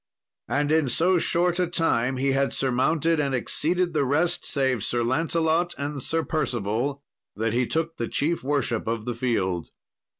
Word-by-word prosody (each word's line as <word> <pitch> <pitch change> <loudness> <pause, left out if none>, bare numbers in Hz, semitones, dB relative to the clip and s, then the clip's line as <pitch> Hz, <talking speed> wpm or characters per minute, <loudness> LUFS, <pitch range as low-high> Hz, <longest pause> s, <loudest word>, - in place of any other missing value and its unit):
And 145 +1 0
in 155 -4 +3
so 175 +8 +3
short 175 +2 +1
a 180 - +2
time 130 -7 0
he 135 +1 +1
had 135 +1 +1
surmounted 150 +5 +1
and 140 -2 0
exceeded 175 +7 0
the 150 -2 +2
rest, 160 +6 +1
save 130 -6 +1
Sir 120 -1 0
Lancelot 160 +6 +1
and 145 0 -4
Sir 165 +5 0
Percival, 130 -1 -2 0.3
that 110 +1 -1
he 125 0 +1
took 165 0 -2
the 115 - -2
chief 160 +2 -1
worship 135 -5 -1
of 115 -1 -2
the 120 - -2
field. 95 -8 -1
140 Hz, 165 wpm, -25 LUFS, 125-165 Hz, 0.3 s, in